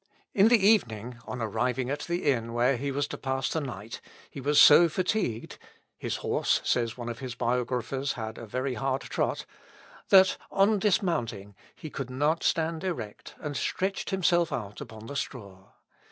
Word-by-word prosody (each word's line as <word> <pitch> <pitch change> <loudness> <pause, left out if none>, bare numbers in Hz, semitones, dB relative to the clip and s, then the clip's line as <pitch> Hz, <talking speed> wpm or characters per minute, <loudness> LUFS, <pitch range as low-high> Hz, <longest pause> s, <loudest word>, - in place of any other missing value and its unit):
In 200 +2 +5
the 240 +1 +6
evening, 125 - +2
on 125 -2 -4
arriving 125 +4 -1
at 145 - -2
the 175 +1 -2
inn 115 -5 +1
where 125 +3 +3
he 140 +4 -3
was 140 +1 -1
to - - -6
pass 135 0 -1
the 160 - -1
night, 115 -5 -7 0.3
he 140 - -7
was 145 +2 +3
so 170 +3 +8
fatigued 180 - -2 0.4
(his - - -3
horse, - - +2
says 115 -1 0
one 120 -1 -6
of 120 0 -5
his 130 -2 -6
biographers, 125 +3 -1
had 110 -1 -6
a 115 - -8
very 130 +4 -2
hard 135 +1 -1
trot,) - - -2 0.6
that, 190 -1 +6
on 200 +2 +3
dismounting, 120 - 0 0.2
he 155 - -9
could 135 -2 -5
not 145 +6 0
stand 160 0 0
erect, 120 - -5
and 145 -2 -4
stretched 190 +7 -2
himself 175 -3 +2
out 105 -6 -5
upon 110 0 -9
the 140 - -7
straw. 100 -8 -6
130 Hz, 170 wpm, -28 LUFS, 115-165 Hz, 0.6 s, so